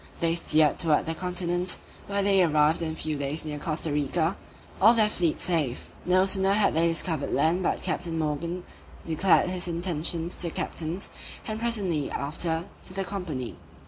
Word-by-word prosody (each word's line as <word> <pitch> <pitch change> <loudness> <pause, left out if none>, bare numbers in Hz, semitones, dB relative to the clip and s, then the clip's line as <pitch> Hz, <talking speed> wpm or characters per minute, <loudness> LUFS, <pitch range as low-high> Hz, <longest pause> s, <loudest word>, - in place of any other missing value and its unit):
They 165 -1 +2
steered 155 -3 +2
towards 160 -4 +2
the 165 - -2
continent, 180 +1 -1 0.3
where 200 0 0
they 195 -1 +4
arrived 155 0 +3
in 160 -1 -2
a - - -7
few 155 -2 -3
days 145 +3 -3
near 150 -1 -4
Costa 155 0 -2
Rica, 160 +5 0 0.5
all 225 +4 +7
their 215 -2 +4
fleet 170 -5 0
safe. 155 -8 -1 0.2
No 185 +1 +4
sooner 195 0 +3
had 205 0 +3
they 165 +2 +3
discovered 165 -3 -1
land 160 +6 +2
but - - -1
Captain 170 -2 -2
Morgan 160 +3 -2 0.4
declared 180 +2 +3
his 180 -1 -2
intentions 170 0 0
to 175 - -1
the - - -1
captains, 165 +3 -4 0.3
and 215 0 -4
presently 200 -11 0
after 160 +3 -2 0.2
to 185 - -9
the 195 - -1
company. 175 -11 -5
170 Hz, 175 wpm, -27 LUFS, 155-185 Hz, 0.5 s, all